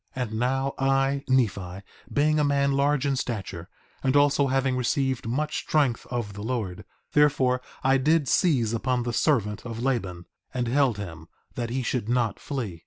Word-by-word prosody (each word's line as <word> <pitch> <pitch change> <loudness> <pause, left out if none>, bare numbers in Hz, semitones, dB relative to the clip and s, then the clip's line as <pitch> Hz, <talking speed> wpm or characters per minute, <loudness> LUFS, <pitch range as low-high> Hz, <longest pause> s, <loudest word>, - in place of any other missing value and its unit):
4:31 125 - 0
And 110 - -3
now 135 +2 0
I, 135 +1 +1
Nephi, 100 -7 0 0.3
being 155 +1 +2
a - - +3
man 140 -1 +2
large 140 0 +2
in 140 -1 +1
stature, 95 -9 -4 0.3
and 130 +1 +1
also 145 0 +4
having 135 0 +1
received 130 0 0
much 150 +6 -1
strength 140 -6 0
of 120 -5 -3
the 100 - -8
Lord, 110 -6 -3 0.3
therefore 130 -4 +3 0.2
I 135 0 +4
did 150 +1 +2
seize 125 - +2
upon 125 +1 0
the 120 0 -3
servant 115 -5 +1
of 115 -2 -6
Laban, 95 -10 -2 0.3
and 125 -1 -1
held 130 -3 +2
him, 80 -5 -7 0.3
that 120 -1 -3
he 130 +2 -2
should 115 -2 -2
not 120 -4 0
flee. 115 - -4
125 Hz, 175 wpm, -26 LUFS, 115-140 Hz, 0.3 s, also